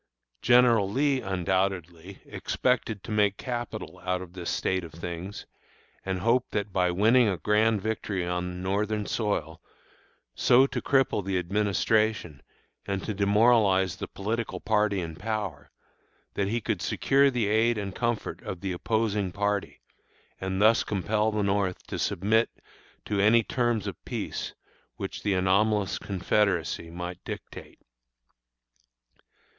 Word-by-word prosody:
General 120 -5 +5
Lee, 135 +4 +1
undoubtedly, 95 -1 -2
expected 115 -5 -1
to - - -7
make 105 -2 +2
capital 120 -6 -5
out 90 0 0
of 90 -1 -10
this 90 -2 -5
state 95 -1 0
of 80 - -10
things, 85 +4 -6 0.6
and 95 -1 -2
hoped 120 +4 +1
that 100 -2 -2
by 90 -1 +2
winning 110 +7 +4
a 95 - -1
grand 105 +1 +2
victory 105 -4 -2
on 90 +1 -3
Northern 105 +2 -1
soil, 80 -9 -2 0.7
so 125 +2 +5
to - - -3
cripple 135 -7 +2
the 95 0 -1
Administration 100 -2 0 0.5
and 100 -1 -2
to 110 - -3
demoralize 100 -2 +3
the - - -5
political 110 +3 -3
party 105 -3 +1
in 80 -2 -6
power, 100 -8 -4 0.6
that 100 - -1
he 115 +3 -1
could 105 -5 -2
secure 140 +9 +3
the 120 -4 0
aid 110 +3 +2
and 100 -2 -4
comfort 120 0 -2
of 90 - -6
the 95 - -2
opposing 105 0 0
party, 100 +1 -2 0.6
and 95 0 -2
thus 110 +2 +5
compel 105 +2 0
the 105 -1 0
North 100 -2 0
to - - -5
submit 110 +5 +2 0.6
to 105 - -1
any 115 +3 +5
terms 120 -3 0
of 100 -5 -6
peace - - -4 0.4
which - - -6
the 100 -2 +1
anomalous 100 +2 +2
Confederacy 95 -3 0
might 90 +1 -7
dictate. - - -8
100 Hz, 135 wpm, -27 LUFS, 95-110 Hz, 0.7 s, General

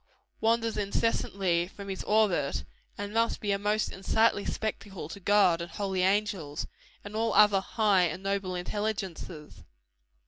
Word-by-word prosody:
wanders 230 0 +1
incessantly 195 -4 0
from 200 +1 -10
his 190 -1 -4
orbit, 205 -10 +2 0.3
and 205 +1 -5
must 230 +1 +1
be 205 - -1
a 200 - +1
most 210 +1 0
unsightly 205 +2 +2
spectacle 200 -6 -4
to 185 - -8
God 190 -3 +4
and 170 - -5
holy 195 -2 -2
angels, 190 -6 0 0.4
and 205 +1 -8
all 225 +1 0
other 210 -2 +6
high 200 -3 +3
and 180 +3 -4
noble 195 -2 -1
intelligences. 180 - -4
200 Hz, 140 wpm, -29 LUFS, 180-210 Hz, 0.4 s, other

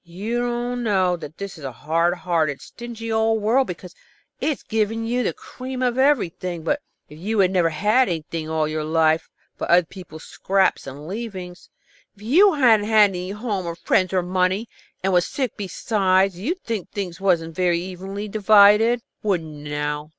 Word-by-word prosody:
You 200 +8 -4
don't 245 0 -2
think 185 -5 +1
that 150 +2 -9
this 200 -4 -7
is - - -12
a 135 - -4
hard 165 +8 0
hearted, 165 -5 -1
stingy 230 -1 -8
old 220 0 +2
world, 235 +6 +2
because 180 0 -8 0.5
it - - 0
has 295 - -3
given 225 +1 -1
you 245 +2 0
the - - 0
cream 255 0 -7
of 250 0 0
everything. 185 - +1
But 160 - 0 0.3
if 150 +1 -13
you'd 195 0 +1
never 175 -3 +2
had 210 +9 +2
anything 160 -1 -4
all 160 -1 0
your 155 0 -3
life 160 0 +2 0.3
but - - -4
other 175 0 +5
people's 165 -3 -11
scraps 190 -6 0
and 140 +3 -9
leavings, 185 -3 -7 0.5
and 210 - -13
you 370 - +5
hadn't 225 -6 +4
any 200 -4 +3
home 205 -3 -3
or 170 - -4
friends 185 +1 +1
or 185 -2 +1
money, 185 +4 0 0.4
and 190 0 +1
was 175 -1 +3
sick 260 -5 -3
besides, 195 -1 +1
you'd 310 - -4
think 220 -6 -4
things 190 -3 -5
wasn't 170 -4 +1
very 180 -2 +2
evenly 190 +3 -6
divided. 215 +3 +5 0.2
Wouldn't 160 -7 -3
you - - -6
now? 150 0 -3
190 Hz, 175 wpm, -22 LUFS, 170-225 Hz, 0.5 s, other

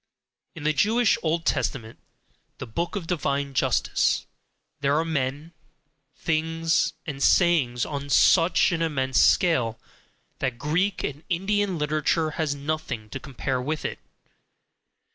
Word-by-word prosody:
In 155 - -8
the 155 +1 +2
Jewish 220 - +3
"Old 165 0 -1
Testament," 115 -8 -2 0.6
the - - -6
book 170 - -3
of 195 -5 -3
divine 140 -5 -1
justice, 125 - +1 0.5
there 140 +1 +1
are 160 - +1
men, 145 +1 -3 0.6
things, 165 +1 0
and 140 -3 -6
sayings 140 -11 +3
on 140 -1 -5
such 165 +6 +4
an 165 -1 -1
immense 135 -5 +1
scale, 120 -11 +2 0.6
that 130 -2 -2
Greek 180 +9 0
and 145 +1 -4
Indian 195 +1 0
literature 155 +1 0
has 150 -2 -2
nothing 140 -7 -4
to 135 - -5
compare 130 0 -3
with 155 +4 -3
it. - - -4
155 Hz, 125 wpm, -25 LUFS, 135-165 Hz, 0.6 s, such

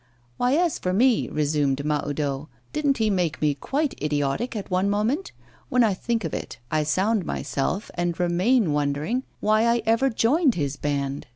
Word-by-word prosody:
'Why, 250 +1 +2
as 340 0 +1
for 180 - -1
me,' 240 +4 +3
resumed 145 -2 0
Mahoudeau, 145 -1 -2 0.2
'didn't 290 -3 +1
he 220 -2 +1
make 175 -6 0
me 150 -1 +2
quite 275 - -1
idiotic 150 - -1
at 200 -2 -5
one 185 +2 +2
moment? 225 - 0 0.4
When 250 -1 +4
I 215 -3 +3
think 225 +4 -2
of 165 - -4
it, - - -5
I 155 - +2
sound 190 +7 +1
myself, 170 +6 -2
and 175 -1 -2
remain 180 - +2
wondering 150 - -1 0.2
why 215 +1 +3
I 235 -1 +2
ever 230 +4 +3
joined 260 +4 +2
his 145 -3 -1
band. 140 -2 -2
185 Hz, 170 wpm, -24 LUFS, 150-235 Hz, 0.4 s, When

